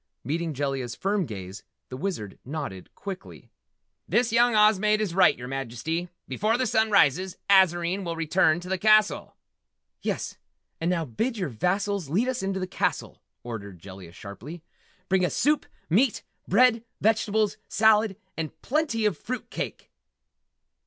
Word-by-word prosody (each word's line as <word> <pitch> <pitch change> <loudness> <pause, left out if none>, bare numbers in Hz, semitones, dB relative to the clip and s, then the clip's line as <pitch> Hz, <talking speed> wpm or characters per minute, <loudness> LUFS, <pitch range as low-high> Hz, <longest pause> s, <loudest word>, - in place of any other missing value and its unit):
Meeting 160 +1 -2
Jellia's 135 -3 -2
firm 195 -3 0
gaze, 95 -2 -8 0.3
the 130 - -6
Wizard 130 - -4
nodded 135 - -6
quickly. 195 -2 -8 0.6
"This 240 -1 +2
young 240 0 +4
Oz 210 -1 +5
maid 215 +1 +2
is 210 -5 -1
right, 175 -5 +5
your 125 - -7
Majesty! 135 +7 -3 0.2
Before 215 - +1
the 255 - +1
sun 220 -2 +2
rises 185 -1 +3
Azarine 185 0 +4
will 170 -2 -3
return 165 0 +2
to 180 - -9
this 190 -1 -1
castle!" 215 +1 +3 0.7
"Yes - - -3 0.4
and 165 - 0
now 170 -3 0
bid 225 - -2
your 185 -6 -2
vassals 180 - -1
lead 205 - +1
us 255 -1 -1
into 195 0 -2
the 185 - -2
castle!" 185 - -2 0.2
ordered 100 -5 -7
Jellia 95 -1 -11
sharply. 120 - -10 0.4
"Bring 190 -1 +2
us 180 - 0
soup, 300 +1 +2 0.2
meat, 220 - +2 0.2
bread, 230 +2 +4 0.2
vegetables, 215 -1 +1
salad 215 -2 +3 0.2
and 160 -2 -5
plenty 270 -6 0
of 210 - +2
fruit 255 +1 -4
and - - -36
cake!" - - -5
185 Hz, 150 wpm, -26 LUFS, 145-215 Hz, 0.7 s, Oz